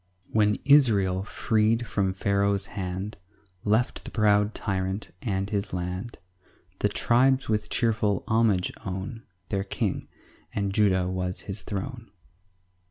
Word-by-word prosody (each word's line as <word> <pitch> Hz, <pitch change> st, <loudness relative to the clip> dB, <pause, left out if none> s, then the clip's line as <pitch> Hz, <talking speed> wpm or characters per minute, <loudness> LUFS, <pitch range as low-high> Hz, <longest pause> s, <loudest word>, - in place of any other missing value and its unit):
1 -, -, -24 dB
When 105 Hz, -1 st, +3 dB
Israel, 105 Hz, -10 st, +5 dB
freed 110 Hz, +2 st, +1 dB
from 100 Hz, -4 st, 0 dB
Pharaoh's 100 Hz, 0 st, +1 dB
hand, 95 Hz, +1 st, -4 dB, 0.5 s
Left 110 Hz, +4 st, +1 dB
the -, -, -7 dB
proud 105 Hz, -1 st, +3 dB
tyrant 95 Hz, 0 st, -2 dB
and 95 Hz, -4 st, -1 dB
his 100 Hz, -1 st, -2 dB
land, 90 Hz, +5 st, -4 dB, 0.6 s
The -, -, +2 dB
tribes 130 Hz, +3 st, +3 dB
with 105 Hz, -1 st, 0 dB
cheerful 110 Hz, -4 st, +1 dB
homage 110 Hz, -5 st, +2 dB
own 95 Hz, +5 st, -5 dB, 0.3 s
Their 100 Hz, -1 st, 0 dB
King, 95 Hz, -, -2 dB, 0.5 s
and 100 Hz, -2 st, -1 dB
Judah 95 Hz, -3 st, +3 dB
was 90 Hz, 0 st, -2 dB
his 100 Hz, 0 st, -5 dB
throne. 115 Hz, +5 st, -5 dB
100 Hz, 125 wpm, -27 LUFS, 95-110 Hz, 0.6 s, Israel